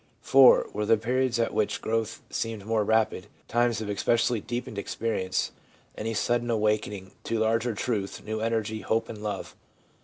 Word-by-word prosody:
' - - -38
IV. - - -11 0.4
Were 105 +1 -1
there 115 - +5
periods 125 +3 0
at 115 -1 0
which 105 -1 0
growth 115 0 -2
seemed 110 -3 -3
more 110 -1 +1
rapid; 110 +1 +1 0.2
times 120 -2 +1
of 110 - -4
especially 115 +2 +1
deepened 120 -2 -4
experience; 100 -3 -2 0.4
any 110 +1 -3
sudden 120 +2 0
awakening 105 -3 0
to 115 - -1
larger 115 +1 +1
truth, 100 -3 -2
new 110 0 -3
energy, 110 -1 -1
hope 110 +4 0
and 105 -2 -7
love 105 -2 -4
110 Hz, 160 wpm, -27 LUFS, 105-115 Hz, 0.4 s, there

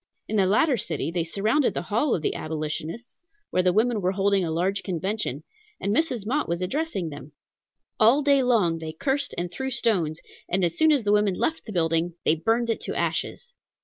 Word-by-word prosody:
In 215 - -1
the 190 -2 +4
latter 260 - +3
city 200 -5 -3
they 170 -1 0
surrounded 215 - +1
the - - -2
hall 230 +6 +1
of 160 - -4
the - - 0
Abolitionists, 155 - -5 0.3
where 185 - +2
the 180 0 +3
women 220 +2 +2
were 185 +1 +1
holding 195 0 +2
a 170 - -2
large 185 +5 0
convention, 185 - -3 0.4
and 200 +2 0
Mrs. 250 -10 0
Mott 280 +7 -1
was 170 0 -1
addressing 195 - -2
them. 145 0 -10 0.7
All 240 +7 +5
day 280 -1 +4
long 210 -10 +2
they 160 -1 -6
cursed 275 - -2
and 175 0 -2
threw 265 +8 -3
stones, 175 -11 0 0.3
and 185 0 +2
as 170 - -1
soon 315 0 +4
as 280 -6 +2
the 205 - +1
women 210 -2 +3
left 320 - -1
the 220 - -7
building, 165 -1 0
they - - +5
burned 225 +8 +1
it 225 - -3
to - - -4
ashes. 485 0 -2
200 Hz, 205 wpm, -25 LUFS, 170-240 Hz, 0.7 s, All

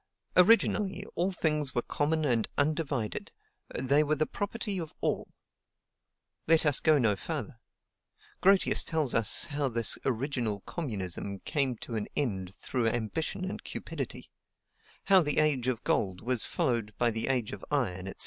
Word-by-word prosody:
"Originally, 205 +1 +4
all 180 +3 0
things 150 -6 +1
were 120 - +1
common 155 +1 0
and 120 -5 +1
undivided; 145 -6 -1 0.5
they 140 +4 +3
were 155 +1 +1
the 155 +1 +1
property 205 0 -3
of 160 -3 -7
all." - - -1 1.2
Let 160 0 +4
us 145 -2 +3
go 155 -2 +4
no 110 -6 +2
farther. - - -5 0.8
Grotius 195 0 +4
tells 155 -6 -1
us 115 -2 +3
how 145 -2 -1
this 115 -2 +3
original 120 -5 -1
communism 100 - -3
came 135 -4 0
to 120 - -7
an 105 - -3
end 95 -10 -1
through 125 -3 -1
ambition 120 - -2
and 190 - -5
cupidity; - - -6 0.7
how 195 -2 +6
the 150 -3 -1
age 145 -5 +2
of 125 -3 -1
gold 95 -2 0
was 125 -1 +2
followed 115 -4 -1
by 120 -1 +3
the 110 0 -2
age 125 -5 0
of 105 - -8
iron, 95 -11 -1
&c. 95 - -5
135 Hz, 150 wpm, -30 LUFS, 115-155 Hz, 1.2 s, how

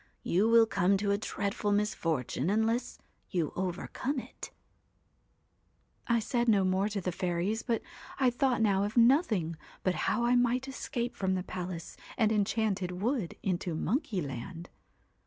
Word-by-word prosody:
You 200 +6 +2
will 230 0 +7
come 195 -2 +2
to 200 +1 0
a 200 - +2
dreadful 205 0 -2
misfortune 165 - 0
unless 225 +4 0 0.3
you 170 -5 -1
overcome 190 +9 -3
it" 255 - -7 1.6
I' 235 - +3
said 235 +2 0
no 200 -3 +4
more 190 +2 +1
to 205 -1 -2
the 180 -1 -2
fairies, 180 +4 -1
but 230 -2 -1 0.4
I 260 -2 +4
thought 250 -2 +1
now 200 -2 +3
of 210 +3 -3
nothing 230 - +4 0.3
but 185 - +2 0.2
how 235 +3 +1
I 240 - +3
might 245 +2 +2
escape 245 -2 -3
from 190 -1 0
the 185 - -2
palace 180 -2 -6 0.2
and 220 -3 +3
enchanted 205 -3 0
wood 225 -4 -1
into 175 -3 -1
Monkeyland. 175 - -3
205 Hz, 145 wpm, -30 LUFS, 185-235 Hz, 1.6 s, will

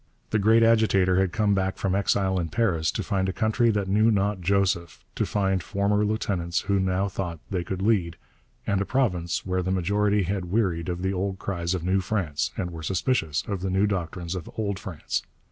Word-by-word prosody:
The 110 - +2
great 110 +3 +5
agitator 100 -5 +4
had 95 -2 +1
come 105 +1 +2
back 95 -1 0
from 95 - -1
exile 95 -1 +1
in 85 -2 -2
Paris 85 -5 +1
to - - -2
find 95 -3 0
a - - 0
country 110 +3 +2
that 105 -3 0
knew 105 +3 +3
not 100 -2 +1
Joseph, 90 -2 0
to - - -1
find 95 -2 0
former 100 +3 +1
lieutenants 95 -5 -1
who 100 0 +1
now 95 +1 +1
thought 90 -3 -4
they 90 -3 -1
could 95 +2 -4
lead, 95 -7 +1 0.5
and 100 -1 +1
a - - 0
province 90 -11 0
where 95 0 0
the 90 - -3
majority 100 +3 +1
had 95 0 -2
wearied 90 -3 0
of 90 +1 -3
the 95 +1 0
old 95 +1 -2
cries 85 -2 -2
of 90 - -4
New 95 +2 +2
France 85 -6 -1
and 90 -5 -2
were 85 -1 -7
suspicious 80 - 0
of 100 -3 -3
the 95 - -2
new 95 +2 +2
doctrines 90 -3 -3
of 90 -4 -6
Old 100 -3 -2
France. 90 -6 -3
95 Hz, 205 wpm, -26 LUFS, 90-105 Hz, 0.5 s, great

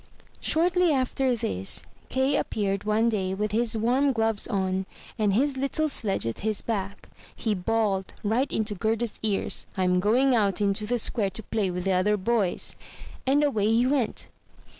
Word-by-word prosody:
Shortly 350 +1 +2
after 260 -1 +1
this, 95 - -1 0.3
Kay 265 +2 +1
appeared 200 -1 -1
one 215 +2 +2
day 190 -4 -1
with 210 +1 -2
his 225 +1 0
warm 255 +5 +2
gloves 225 -2 0
on, 190 -3 -1 0.3
and 210 -2 +2
his 275 +3 +1
little 275 +3 0
sledge 210 - -1
at 115 - -3
his 215 0 -1
back. 200 -3 -4 0.3
He 220 - -1
bawled 200 0 0
right 230 +6 0
into 215 -1 -1
Gerda's 220 +2 -1
ears, 210 -3 0
"Fm 180 -1 +2
going 245 +7 +3
out 205 -5 +2
into 205 +1 0
the 245 +2 +1
square 210 -2 +1
to 195 +4 -5
play 205 -2 -1
with 180 0 -3
the 195 - 0
other 195 +3 +2
boys," 205 -2 +1 0.5
and 285 +3 +4
away 220 -8 +1
he 235 +2 +3
went. 260 -3 0
215 Hz, 165 wpm, -26 LUFS, 195-245 Hz, 0.5 s, and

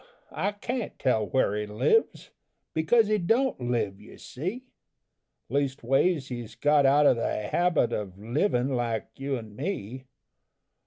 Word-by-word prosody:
I 200 +5 -1
can't 235 +3 -4
tell 110 -5 +1
where 130 -6 +1
he 105 0 -3
lives, 110 - +1 0.4
Because 220 +9 +3
he 215 0 +2
don't 230 - +1
live, 110 -5 -1
you 105 - -14
see: 185 - -5 0.8
Leastways, 135 +3 +1
he's 120 -3 -6
got 145 +3 +4
out 145 +2 +5
of 125 - +5
the 105 -2 -2
habit 175 -8 +2
Of 95 -3 -4
livin' 125 - 0
like 115 -3 -2
you 135 0 -2
and 110 -3 -10
me. 130 - -5
135 Hz, 140 wpm, -27 LUFS, 115-175 Hz, 0.8 s, out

